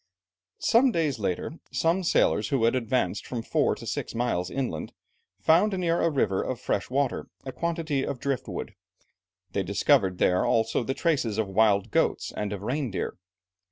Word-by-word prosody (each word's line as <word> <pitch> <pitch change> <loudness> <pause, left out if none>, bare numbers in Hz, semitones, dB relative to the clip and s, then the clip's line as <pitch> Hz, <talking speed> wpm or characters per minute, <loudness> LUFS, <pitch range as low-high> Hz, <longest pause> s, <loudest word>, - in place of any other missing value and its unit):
Some 250 +3 +4
days 155 - 0
later, 100 - -3
some 170 +3 +1
sailors 110 - +2
who 135 -5 +1
had 115 - +4
advanced 120 -5 -1
from 120 -3 -4
four - - +1
to - - -10
six - - -4
miles 115 -7 0
inland, 120 - -3 0.5
found 185 +6 +4
near 170 -2 +1
a 165 - +3
river 110 -10 +1
of 130 -2 -3
fresh - - -2
water, 135 0 -1 0.2
a 130 - -4
quantity 165 -3 -1
of 135 - -4
drift 135 -2 -2
wood; - - -5 0.8
they - - 0
discovered 95 -2 +2
there 90 0 +3
also 115 +1 +1
the 135 +3 -2
traces 140 - 0
of 110 -2 0
wild 100 0 +2
goats - - +1
and 105 -1 -3
of 100 -1 -5
reindeer. 125 -4 -2
125 Hz, 165 wpm, -27 LUFS, 105-155 Hz, 0.8 s, Some